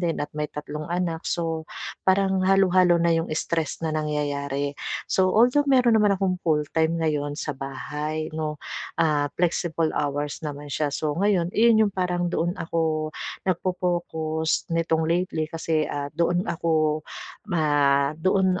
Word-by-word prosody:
din 170 -2 -1
at 145 - -5
may 150 0 -1
3 150 0 -6
anak, 175 -2 -2
so, 165 -2 -2 0.4
parang 190 0 +3
halo-halo 185 -2 +4
na 170 0 +3
'yong 165 +1 0
stress 160 -1 -2
na 160 - 0
nangyayari. 145 -2 -2 0.3
So, 185 -1 +2
although 250 +6 +5
meron 250 -4 +5
naman 210 -2 +4
akong 185 -1 0
full-time 160 +1 +1
ngayon 145 -2 -1
sa 150 - -2
bahay, 150 +3 -4
no, 155 -1 -3 0.4
ah, 150 -3 +2
flexible 170 -2 0
hours 145 0 -2
naman 145 -1 -6
siya, 150 +1 0
so, 150 0 -1
ngayon 190 -3 +2
'yon 220 -1 +5
yong - - -10
parang 180 -1 0
doon 175 0 0
ako 160 -2 -1 0.4
nag-fo-focus 175 -3 -1
nitong 165 -1 +1
lately 170 -2 0
kasi, 160 -1 0
ah, 145 0 -4
doon 170 +2 +1
ako 155 -2 +1 0.5
ma 145 -5 +2
doon 185 +2 +2
165 Hz, 140 wpm, -25 LUFS, 150-180 Hz, 0.5 s, although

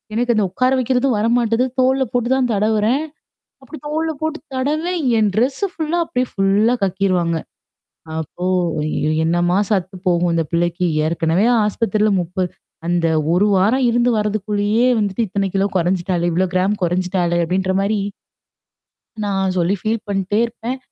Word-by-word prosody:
எனக்கு 240 +1 +1
அந்த 210 -2 +2
உட்கார 255 +6 +1
வைக்கிறதும் 255 -1 +1
வரமாட்டது. 230 +2 +2 0.2
தோள்ல 265 +1 +3
போட்டு 245 0 0
தான் 260 -2 +1
தடவுறேன். 215 +6 +1 0.6
அப்படி 310 +3 -10
தோள் 320 +2 -1
போட்டு 315 +1 -2 0.2
தடவுறேன், 310 +6 -1 0.2
என் 210 -2 +2
டெரெஸ்ஸ 270 - 0
ஃபுல்லா 320 +1 -1
அப்டியே 250 0 -1
ஃபுல்லா 205 +5 +2
கக்கிருவாங்க. 185 -3 0 0.8
அப்போ 170 +3 -7 0.8
என்னமா 175 +2 +1
சத்து 185 -2 -1
போகும் 175 0 +2
இந்த 165 - +1
பிள்ளைக்கு. 175 +1 0 0.2
ஏற்கனவே 165 +3 +1 0.2
ஆஸ்பத்திரில 210 0 +1
முப்ப 180 +2 -2 0.4
அந்த 175 -1 +1 0.3
ஒரு 200 +4 +3
வாரம் 230 +8 +2
இருந்து 240 +1 +2
வர்றதுக்குள்ளேயே 210 +2 0
வந்துட்டு 205 +2 0
இத்தனை 200 0 -1
கிலோ 195 +1 +2
கொறைஞ்சுட்டாளே, 175 0 0
இவ்வளோ 185 +3 +1
கிராம் 190 +3 +1
குறைஞ்சுட்டாளுே 175 0 0
அப்டின்ற 185 +2 0
மாரி 205 +2 0 1.3
நான் 195 -2 0
சொல்லி 180 +3 +2
ஃபீல் 220 0 -1
பண்ணிட்டே 195 +2 0
இருப்பேன். 235 +2 -5
205 Hz, 135 wpm, -19 LUFS, 185-245 Hz, 1.3 s, தோள்ல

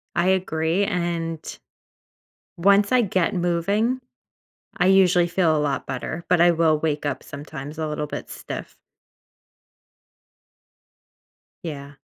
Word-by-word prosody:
I 175 +1 +2
agree, 180 -1 +1
and 170 -4 -2 1.2
once 200 +3 +4
I 255 -1 +4
get 185 -4 0
moving, 195 +8 0 0.8
I - - +2
usually 185 -2 +5
feel 170 -3 +2
a - - +1
lot 145 -2 -1
better, 170 +1 -5
but 180 -1 +3
I 175 0 +7
will 160 -2 +3
wake 150 -1 -1
up 140 -3 -2
sometimes 145 0 -8
a 155 -1 -2
little 150 0 -3
bit - - -7
stiff. - - -7 2.9
Yeah. 145 -4 -6
170 Hz, 120 wpm, -23 LUFS, 155-185 Hz, 2.9 s, I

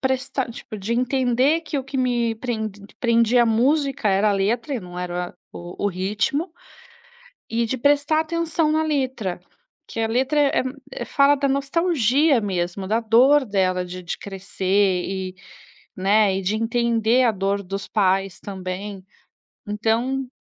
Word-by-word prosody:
prestar 260 -1 -1
tipo, 225 -1 -9
de 205 +3 -3
entender 255 +4 +2
que 305 -2 -3
o 265 - -5
que 270 +1 -6
me 240 -3 +1
pren 220 -2 -3 0.3
prendia 235 0 +4
a - - +2
música 270 +2 +1
era 200 +2 +3
a - - +2
letra 225 +8 0
e 245 - -3
não 180 -1 -9
era 180 0 -4 0.2
o 175 +3 -7
o - - +3
ritmo, 205 - -1 1.0
e 230 +1 0
de 245 +3 -2
prestar 290 +4 +3
atenção 325 -1 0
na 315 +1 +2
letra, 260 - -2 0.5
que 225 - -6
a 225 - +1
letra, 260 +6 +1
eh 285 -2 +3
eh - - -6 0.4
eh, - - -2
fala 280 +1 +4
da 280 0 0
nostalgia 280 -2 +2
mesmo, 185 -1 -2
da 220 +3 +1
dor 255 +6 +4
dela 185 -4 0
de 180 +1 -7
de 175 - -4
crescer 195 -1 0
e, 190 -1 -4 0.6
né, 195 +1 +3
e - - -2
de 195 +3 -1
entender 230 +1 +2
a 235 - +4
dor 200 0 -1
dos 195 +1 -5
pais 195 -2 +1
também, 190 0 -6 0.6
então 230 +6 0
225 Hz, 160 wpm, -22 LUFS, 195-265 Hz, 1.0 s, prendia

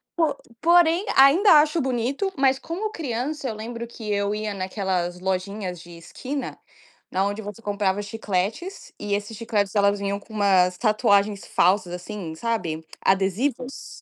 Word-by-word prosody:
Po 315 -5 +1 0.3
porém 345 +3 +4
ainda 310 +9 +7
acho 310 +1 0
bonito, 265 - -1
mas 270 -1 +3
como 390 +6 -4
criança 275 - -3
eu 220 - -4
lembro 230 +2 -6
que 220 -3 -6
eu 200 0 0
ia 215 -1 -3
naquelas 185 -2 -2
lojinhas 185 0 -3
de 175 - -13
esquina, 265 +11 -6 0.5
na 190 +1 +1
onde 205 +2 -2
você 210 +1 -8
comprava 205 -1 0
chicletes, 210 - -3
e 205 -1 -3
esses 205 +2 -5
chicletes 215 -3 -1
elas 200 0 +3
vinham 200 0 -2
com 220 - -16
umas 185 -3 +3
tatuagens 210 -2 +2
falsas, 185 0 +2
assim, 180 -2 -6
sabe, 170 -7 -2 0.2
adesivos. 225 +8 -1
210 Hz, 145 wpm, -24 LUFS, 195-260 Hz, 0.5 s, ainda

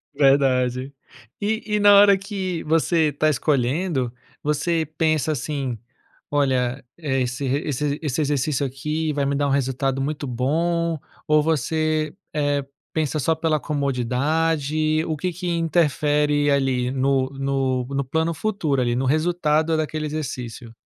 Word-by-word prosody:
Verdade. 135 -2 +2 0.5
E 220 +2 -1
e - - +2
na 205 0 +7
hora 200 0 +7
que 190 -4 -4
você 160 0 +2
tá 155 +2 +1
escolhendo, 140 -1 0 0.3
você 160 +2 0
pensa 155 -1 +2
assim: 135 -2 -3 0.5
"Olha, 130 -2 0
eh, 140 -5 -1
esse 125 +2 -2
re 140 +4 0
esse 145 +1 -1
esse 150 0 -1
exercício 145 -1 0
aqui 150 +4 -2
vai 140 -1 0
me 140 - 0
dar 145 0 +1
um 140 - 0
resultado 135 0 0
muito 145 0 -3
bom" 165 +6 0 0.3
ou 150 0 +4
você, 155 0 0 0.2
eh, 145 -1 0 0.3
pensa 155 -2 0
só 155 +4 +2
pela 155 -1 0
comodidade? 150 +3 0
O 155 -2 -2
que 180 +4 -2
que 180 +2 -5
interfere 150 -3 +2
ali 130 -3 +1
no 135 0 +1 0.6
no 140 0 -1
plano 160 +5 0
futuro 155 -9 0
ali, 120 0 0
no 130 - 0
resultado 155 +1 +1
daquele 155 0 -2
exercício? 125 -6 -5
150 Hz, 140 wpm, -23 LUFS, 135-160 Hz, 0.6 s, na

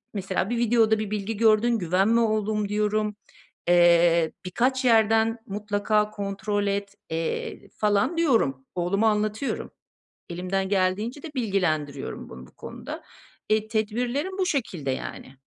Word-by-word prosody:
mesela, 195 0 -2
"Bir 240 - 0
videoda 225 -2 +3
bir 215 -1 -3
bilgi 210 +1 -3
gördün, 225 +1 +3
güvenme 195 +6 +2
oğlum." 215 -2 0
diyorum. 210 0 0 0.5
Eee, 170 -1 +5
"Birkaç 255 +8 0
yerden 225 0 +4
mutlaka 210 +1 0
kontrol 205 0 -2
et." 200 0 -2 0.2
eee, 165 0 -3
falan 210 +9 +1
diyorum. 225 - +1
Oğluma 195 +5 +1
anlatıyorum. 215 +4 -2 0.6
Elimden 185 +2 -2
geldiğince 205 +7 0
de 325 - -7
bilgilendiriyorum 160 - -2
bunu 65 0 -10
bu - - -24
konuda. - - -8 0.5
Eee, 215 0 +2
tedbirlerim 240 - -1
bu 375 - +1
şekilde, 185 - -2
yani. 130 0 -6
210 Hz, 125 wpm, -25 LUFS, 185-225 Hz, 0.6 s, Eee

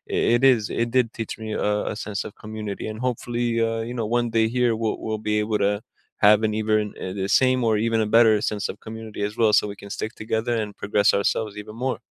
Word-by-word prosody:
it - - +2 0.2
it 120 - 0
is 110 -4 -3
it 120 - 0
did 125 -2 +4
teach 115 - -4
me 110 - -5
a 105 - 0 0.2
a - - -8
sense 105 0 -3
of - - -10
community, 105 -1 -5
and 110 - -8
hopefully, 120 0 -2 0.2
uh, 115 0 -2
you 125 - -5
know, 115 -2 -1
one 120 -1 -1
day 110 0 +4
here, 120 -2 +3
we'll 115 -1 -1
we'll 110 -1 -2
be 105 - +2
able 105 0 -1
to 100 - +2 0.5
have 105 0 +7
an 105 - -2
even 110 0 +2 0.2
eh 95 - -4
the 95 - -2
same 130 0 +3
or 110 - +3
even 115 -1 +1
a 110 - 0
better 115 -2 +6
sense 105 -1 -4
of - - -13
community 110 -1 -7
as 105 - -9
well 110 -2 +4
so - - +4
we - - -9
can 100 - -9
stick 110 - -4
together 110 +2 -1
and 105 - -4
progress 100 0 +2
ourselves 105 +1 0
even 110 +1 -11
more. 130 - -1
110 Hz, 245 wpm, -24 LUFS, 105-115 Hz, 0.5 s, have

